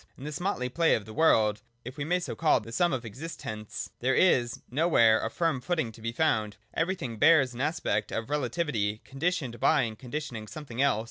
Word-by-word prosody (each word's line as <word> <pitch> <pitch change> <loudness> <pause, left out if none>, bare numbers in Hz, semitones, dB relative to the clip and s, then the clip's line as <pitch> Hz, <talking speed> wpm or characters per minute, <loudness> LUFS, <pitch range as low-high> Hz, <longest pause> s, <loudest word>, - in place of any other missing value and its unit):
In 135 - -11
this 150 0 -5
motley 175 -9 -1
play 165 +6 +3
of 105 - -4
the 110 - -10
world, 110 -9 +3 0.2
if 125 +2 -7
we 145 - -3
may 180 +3 +1
so 175 - -4
call 155 -5 +3
the 115 +1 -10
sum 175 +9 +2
of 130 -2 -2
existents, 110 -4 -6
there 130 +2 +1
is 120 -10 +3
nowhere 125 -7 +4
a - - -1
firm 160 -1 0
footing 160 -5 -1
to 110 - -15
be 115 +1 -2
found: 110 -7 0 0.2
ever3fthing 165 - -2
bears 145 -4 +5
an 120 - -5
aspect 110 -9 -1
of 115 - -3
relativity, 125 -7 -1
conditioned 135 -4 -2
by 150 -4 +4
and 110 -2 -5
conditioning 125 -4 -5
something 130 +1 -5
else. 140 -6 +3
130 Hz, 200 wpm, -28 LUFS, 110-160 Hz, 0.2 s, bears